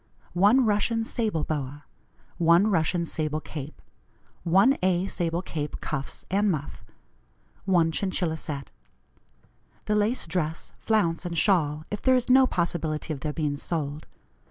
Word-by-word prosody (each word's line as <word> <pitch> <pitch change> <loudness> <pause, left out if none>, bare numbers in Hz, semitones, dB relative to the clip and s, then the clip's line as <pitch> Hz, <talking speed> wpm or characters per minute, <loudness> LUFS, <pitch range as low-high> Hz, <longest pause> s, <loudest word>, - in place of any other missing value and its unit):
1 210 +8 +5
Russian 220 +2 +1
sable 215 -10 -1
boa. 145 -1 -4 0.5
1 170 +5 +5
Russian 170 0 +1
sable 155 -2 -2
cape. 150 -1 -8 0.6
1 195 +11 +4
A. 185 0 +2
sable 175 -2 -2
cape, 150 -5 -4
cuffs 140 -3 -5
and 200 +2 +2
muff. 150 -5 -4 0.8
1 175 -4 +3
Chinchilla 180 -2 -1
set. 140 -3 -6 1.1
"The 210 - 0
lace 210 +4 +1
dress, 165 -1 -3
flounce, 175 -8 +1
and 175 -2 -4
shawl, 155 -5 +2
if 210 - -3
there 260 -1 +4
is 250 0 +1
no 260 0 +7
possibility 165 -4 -2
of 140 - -7
their 150 +3 -3
being 150 -2 -2
sold. 150 -1 -3
170 Hz, 135 wpm, -26 LUFS, 155-200 Hz, 1.1 s, no